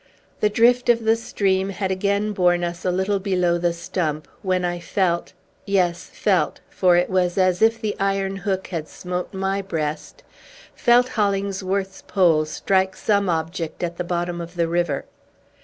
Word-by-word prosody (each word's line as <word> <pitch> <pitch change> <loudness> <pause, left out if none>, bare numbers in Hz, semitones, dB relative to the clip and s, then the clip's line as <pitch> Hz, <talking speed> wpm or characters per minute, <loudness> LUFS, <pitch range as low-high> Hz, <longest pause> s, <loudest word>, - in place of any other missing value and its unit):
The 210 - +3
drift 240 +3 +3
of 235 -1 +4
the 225 0 +4
stream 195 -4 0
had 195 -1 -2
again 200 +2 0
borne 175 -2 +2
us 175 +1 -4
a - - +1
little 190 +2 0
below 180 -3 +1
the 175 0 +1
stump, 170 -3 -3
when 185 -2 0
I 175 0 -2
felt 170 0 -1 0.3
yes, 180 -3 0
felt, 185 -7 +1
for 180 -2 +3
it 175 - +2
was 180 -1 0
as 185 -2 +2
if 225 +1 +4
the 215 -2 -2
iron 195 0 0
hook 190 -1 -2
had 165 -4 -4
smote 180 0 -5
my 195 0 -1
breast 160 - -4 0.5
felt 245 -1 +4
Hollingsworth's 195 -3 -1
pole 170 -6 +3
strike 190 +4 0
some 200 -2 +1
object 165 +1 -3
at 170 0 -3
the 180 - -2
bottom 175 0 -2
of 170 +1 -9
the 170 -1 +1
river! 170 -4 -1
185 Hz, 165 wpm, -22 LUFS, 175-200 Hz, 0.5 s, of